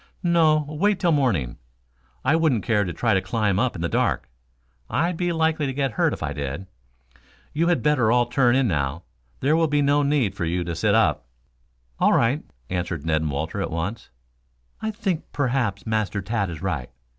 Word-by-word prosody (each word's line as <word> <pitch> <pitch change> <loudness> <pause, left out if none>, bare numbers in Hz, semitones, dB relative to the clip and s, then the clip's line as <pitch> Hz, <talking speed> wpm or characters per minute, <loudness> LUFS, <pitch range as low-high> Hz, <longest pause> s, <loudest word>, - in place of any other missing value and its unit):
"No; 160 -3 +3
wait 185 +7 +1
till 175 -3 +2
morning. 110 - +1 0.7
I 145 - +4
wouldn't 155 -10 +2
care 105 -4 +1
to 90 - -3
try - - +1
to 95 - +2
climb 100 0 0
up 130 -1 0
in 85 - -4
the - - +1
dark. - - 0 0.6
I'd 170 +3 0
be 175 +1 -1
likely 160 -2 +1
to 135 - -3
get 135 -1 0
hurt - - +1
if - - -5
I - - -2
did. 70 +6 -4 0.9
You 165 +3 +1
had 175 -1 +1
better 130 -7 +3
all 120 0 +4
turn 120 0 +2
in 135 -1 +3
now. 75 -1 -1 0.4
There 145 +4 +3
will 165 0 +3
be 145 -1 +2
no 145 +1 +3
need 140 -8 +1
for 85 - -3
you 90 +2 -1
to 85 -1 -4
sit 100 +4 +2
up." 75 - +2 0.7
"All - - +4
right," 125 +6 +2 0.2
answered 90 -4 -3
Ned 80 -1 +1
and 80 - -1
Walter 80 +8 -3
at - - -2
once. 85 +7 -4 0.7
"I 220 - -1
think 200 -6 -2
perhaps 125 -8 -1
Master 110 -2 -1
Tad 100 -2 -1
is 80 -1 -7
right. 80 -10 -2
115 Hz, 195 wpm, -24 LUFS, 90-150 Hz, 0.9 s, I